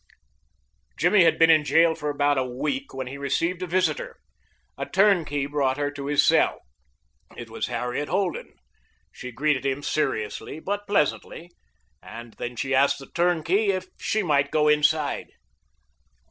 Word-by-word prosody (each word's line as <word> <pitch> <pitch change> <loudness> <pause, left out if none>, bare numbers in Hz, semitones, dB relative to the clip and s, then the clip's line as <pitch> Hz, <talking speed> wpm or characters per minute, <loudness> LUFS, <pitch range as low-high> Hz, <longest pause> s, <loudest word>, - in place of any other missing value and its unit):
Jimmy 175 +3 +4
had 165 - +3
been 165 0 +6
in 155 -1 +4
jail 160 +3 +4
for 150 -1 -4
about 145 -1 +1
a - - +1
week 200 - -4
when 130 0 -5
he 135 +3 -8
received 165 +6 -1
a 185 - -3
visitor. 185 - -1 0.6
A - - -5
turnkey 175 -8 +2
brought 140 -2 -1
her 145 0 -1
to 140 -1 -7
his 145 0 +3
cell. - - +2 0.8
It - - -9
was - - -3
Harriet 125 +4 -3
Holden. 190 -2 -2 0.6
She 125 - -9
greeted 140 +2 0
him 135 +1 -2
seriously 135 -2 -2
but 205 +4 -4
pleasantly, 175 -2 -1 0.5
and 115 0 -11
then 120 0 -5
she 135 +3 -2
asked 140 +1 +3
the 135 - -13
turnkey 175 +4 +1
if 185 -1 -2
she 215 0 -1
might 140 -4 +1
go 150 0 +2
inside. 150 0 +1
150 Hz, 155 wpm, -24 LUFS, 140-175 Hz, 0.8 s, been